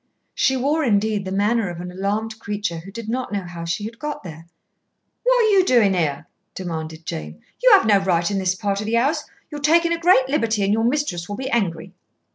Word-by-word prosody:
She 265 0 +2
wore, 295 +5 +1
indeed, 210 -4 +1
the 190 - -4
manner 205 +1 +1
of 170 -1 -7
an 180 0 -6
alarmed 210 +4 -3
creature 205 -5 -3
who 185 +4 -11
did 230 +1 -8
not 250 +1 -3
know 200 -2 -2
how 170 -1 -7
she 170 +5 -2
had 230 +2 -8
got 295 0 -5
there. 165 -2 -10 0.7
"What - - +3
are 440 - +3
you 395 -2 +5
doing 235 - +4
here?" 155 -3 -1 0.3
demanded 160 -3 -6
Jane. 75 - -6 0.2
"You - - +6
have 395 - +6
no 205 -2 +5
right 175 -2 +1
in 195 - 0
this 185 -1 0
part 200 +1 -2
of 210 - -4
the 230 - 0
house. 290 +6 +1 0.3
You're 295 -1 -6
taking 335 +3 +3
a 335 - -2
great 330 -7 +4
liberty, 230 -7 0
and 195 +1 +2
your 225 +1 +1
mistress 240 - -1
will 205 - -3
be 265 +1 -4
angry." 185 -6 -1
205 Hz, 225 wpm, -22 LUFS, 180-260 Hz, 0.7 s, You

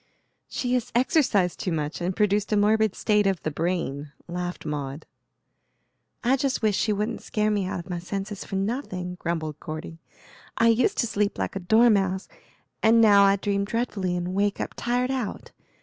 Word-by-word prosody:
"She 250 -1 -2
has 250 -1 -1
exercised 240 - +2
too 185 - -2
much, 155 +1 -3
and 180 +1 -1
produced 210 0 +1
a 210 - +3
morbid 215 0 +3
state 210 -2 +2
of 190 -3 -1
the 155 - -1
brain," 150 -3 -2 0.2
laughed 175 0 -5
Maud. 145 -1 -4 1.2
"I 255 +3 +3
just 270 -3 -1
wish 210 -2 +3
she 215 - +1
wouldn't 210 +3 -2
scare 215 0 0
me 200 -3 0
out 190 - -3
of 170 - -9
my 175 -2 -3
senses 195 +3 -5
for - - -6
nothing," 195 -4 -3
grumbled 160 -3 -3
Cordy; 155 +1 -7 0.6
"I 230 - +5
used 230 +2 +2
to - - 0
sleep 205 -2 -1
like - - -3
a - - -1
dormouse, 195 -1 +3 0.5
and 225 +1 +5
now 205 -3 +7
I 195 0 +5
dream 200 0 -1
dreadfully 200 -5 -2
and 175 +1 -3
wake 200 +1 0
up - - -3
tired 250 +2 0
out. 255 -6 -4
200 Hz, 180 wpm, -25 LUFS, 180-220 Hz, 1.2 s, now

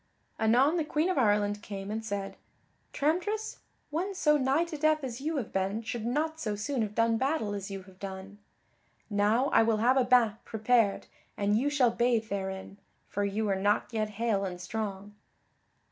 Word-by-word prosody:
Anon 250 +9 +4
the 325 - +1
Queen 305 +3 0
of 305 - 0
Ireland 205 -2 +2
came 200 -1 -6
and 220 +1 -3
said: 200 -2 -4 0.6
"Tramtris, 365 +9 -1 0.3
one 370 +6 -2
so 300 -4 +3
nigh 275 +3 +2
to 335 -2 -6
death 310 0 +2
as 250 -1 -5
you 315 +2 -1
have 240 -6 -4
been 195 +4 -1
should 225 0 -4
not 315 +5 -1
so 215 -8 -2
soon 240 +5 -2
have 210 -1 -3
done 230 0 +3
battle 260 -5 0
as 200 -1 -5
you 195 -1 -6
have 185 0 -18
done. 195 +1 -8 0.7
Now 215 +6 +2
I - - +5
will 225 -1 +2
have 245 +5 +3
a 260 - +5
bain 245 -4 +4
prepared 220 -2 +1 0.3
and 205 0 +2
you 260 +6 +2
shall 265 -5 +3
bathe 235 -2 +1
therein, 190 0 -5 0.3
for 205 - -1
you 205 +2 -1
are 195 - +1
not 205 +4 0
yet 215 -1 0
hale 220 -4 +1
and 180 -2 -4
strong." 200 +1 -5
225 Hz, 185 wpm, -29 LUFS, 205-270 Hz, 0.7 s, I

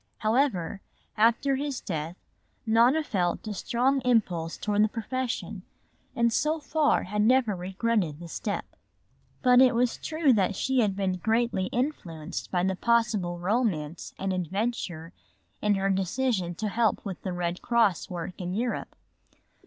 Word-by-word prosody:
However, 215 - 0 0.3
after 235 +5 +3
his 280 -1 -3
death 165 -3 -4 0.5
Nona 235 +7 +4
had - - -17
felt 180 -1 -1
a 215 - -3
strong 260 +6 +1
impulse 180 -9 +1
toward 210 0 +1
the - - +4
profession 230 -3 -3 0.5
and 235 -1 +2
so 310 +5 +1
far 300 0 +1
had 210 +3 -1
never 235 -2 +3
regretted 185 -3 -1
the 170 - -8
step. 200 +5 -3 0.8
But 250 -1 +6
it 255 -2 +5
was 240 0 +1
true 310 -4 +2
that 200 -2 +1
she 265 +5 +1
had 205 -5 +2
been 190 -2 -1
greatly 220 -1 0
influenced 185 - -3
by 180 -1 0
the 190 0 +1
possible 215 -6 +1
romance 175 -5 -1
and 195 0 -2
adventure 185 -2 -3 0.5
in 210 -1 +2
her 195 0 +1
decision 190 -1 0
to 210 +4 -2
help 225 -1 +1
with 190 -4 -5
the 190 - -3
Red 175 0 -3
Cross 230 -6 +2
work 180 0 -6
in 180 +1 -3
Europe. 235 +2 -2
210 Hz, 150 wpm, -27 LUFS, 180-240 Hz, 0.8 s, But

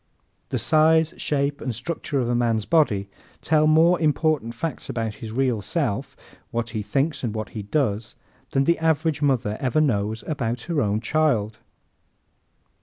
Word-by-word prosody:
The 130 - -1
size, 155 +6 +3
shape 140 -1 -1
and 125 -5 -3
structure 140 +3 -3
of 120 - 0
a 120 - 0
man's 115 -3 +1
body 125 -12 +2 0.3
tell 155 -1 +3
more 165 +3 +4
important 150 -5 +1
facts 155 +3 -4
about 115 -2 -2
his 110 -2 -6
real 125 -2 0
self - - -2 0.3
what 115 -1 -3
he 110 -2 -2
thinks 140 +6 -1
and 110 -3 -2
what 110 0 -4
he 110 - -6
does 105 -1 -1 0.3
than 135 - +2
the 170 +4 +2
average 160 -1 +1
mother 125 -7 +1
ever 130 +3 +1
knows 110 -6 0
about 120 -6 -2
her 165 -1 -1
own 105 -1 0
child. 115 -6 +1
130 Hz, 160 wpm, -24 LUFS, 110-155 Hz, 0.3 s, more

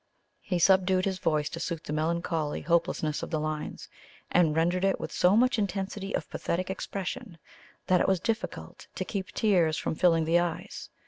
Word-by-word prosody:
He 180 - -1
subdued 185 +1 +4
his 190 -1 -1
voice 150 -1 +1
to 165 - -6
suit 170 -1 -3
the 150 - -5
melancholy 160 -1 -1
hopelessness 165 -2 0
of - - -5
the 155 - -1
lines, 155 0 -4 0.4
and 165 -4 +3
rendered 175 +3 +1
it 195 0 +2
with - - -5
so 185 +4 +4
much 250 -1 +3
intensity 195 0 -2
of - - -3
pathetic 185 +2 -2
expression 190 -3 -5 0.5
that 180 -1 +3
it - - +2
was 190 -2 +2
difficult 220 +5 -4
to - - -3
keep 195 -2 -3
tears 175 -8 +2
from - - -2
filling 165 -1 +3
the 165 +2 +4
eyes. 175 -2 -4
175 Hz, 180 wpm, -28 LUFS, 160-190 Hz, 0.5 s, subdued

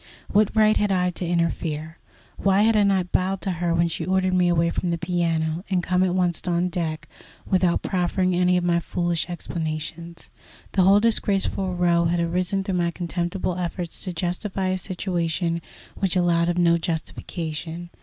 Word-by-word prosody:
What 210 0 +4
right 215 0 +5
had 205 -1 +1
I 180 -1 +2
to 175 0 -4
interfere? 165 -2 -2 0.4
Why 195 +1 +3
had 225 0 +4
I 210 - +5
not 190 -3 +1
bowed 190 +1 +1
to 190 - -1
her 175 -1 -1
when 170 0 +3
she 165 - -3
ordered 185 0 +1
me 180 -1 +3
away 170 -1 +2
from 180 - -2
the 170 - 0
piano, 170 -1 -1
and 185 -2 +1
come 180 0 +1
at 185 -1 +2
once 180 -2 +1
on 175 +1 +1
deck, 165 -4 -3 0.4
without 180 -2 +1
proffering 185 0 0
any 180 0 +3
of 180 - 0
my 170 -1 +2
foolish 175 0 -2
explanations? 165 0 -5 0.4
The 195 - +2
whole 195 +2 +6
disgraceful 195 -4 0
row 170 -1 +2
had 170 +1 +1
arisen 180 +3 0
through 190 -2 -1
my 170 0 +1
contemptible 175 +1 -3
efforts 175 -1 -3
to 185 - -3
justify 185 +2 -2
a 185 - 0
situation 170 -2 -2 0.3
which 190 -2 -1
allowed 170 -1 +2
of 175 - -1
no 170 -1 +4
justification. 165 +1 -4
175 Hz, 175 wpm, -24 LUFS, 170-185 Hz, 0.4 s, whole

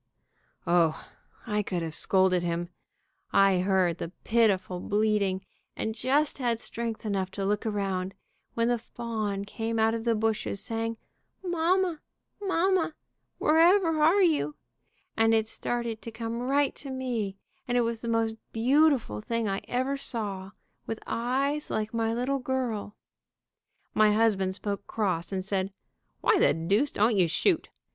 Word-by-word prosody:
O, 170 -2 +2 0.4
I 210 -3 0
could 180 -4 -3
have 160 -1 -4
scolded 185 +1 +3
him. 170 0 -2 0.6
I 195 -2 +5
heard 185 -2 +2
the 165 - -4
pitiful 195 -6 +2
bleating, 205 -2 +1 0.3
and 220 - -2
just 280 +6 +1
had 240 -3 0
strength 230 -1 -4
enough 195 -3 -1
to 195 - -3
look 210 +2 0
around, 195 -2 -2 0.4
when 230 0 +2
the 240 -1 +1
fawn 220 -4 -4
came 225 +2 -3
out 220 0 +3
of 230 -1 -3
the 230 -1 +2
bushes, 215 -2 -1
saying, 225 +1 -3 0.5
'Mamma! 350 -1 +1 0.4
Mamma! 375 -4 +1 0.4
Wherever 330 0 +4
are 350 +6 +5
you?' 305 -3 +2 0.6
and 225 0 +4
it 220 -1 +1
started 235 -1 -3
to - - -6
come 230 +1 -4
right 285 0 +2
to 280 - -6
me, 240 -7 -3 0.3
and 245 0 +1
it - - +4
was 230 -1 -1
the 235 - -5
most 225 -1 +1 0.2
beautiful 255 - +3
thing 230 - -1
I 195 0 -1
ever 260 +3 0
saw, 205 -8 -4 0.4
with 225 - -3
eyes 275 +5 -1
like 215 +1 -2
my 225 -1 0
little 250 +4 0
girl. 245 -5 -2 1.0
My 215 -1 +5
husband 200 -4 +2
spoke 200 0 -4
cross, 185 -6 -1
and 190 -1 -2
said, 195 -1 -1 0.5
'Why - - +4
the - - +4
deuce 200 - +1
don't 215 0 +2
you 185 -3 +4
shoot?' 320 - +1
225 Hz, 150 wpm, -28 LUFS, 195-255 Hz, 1.0 s, I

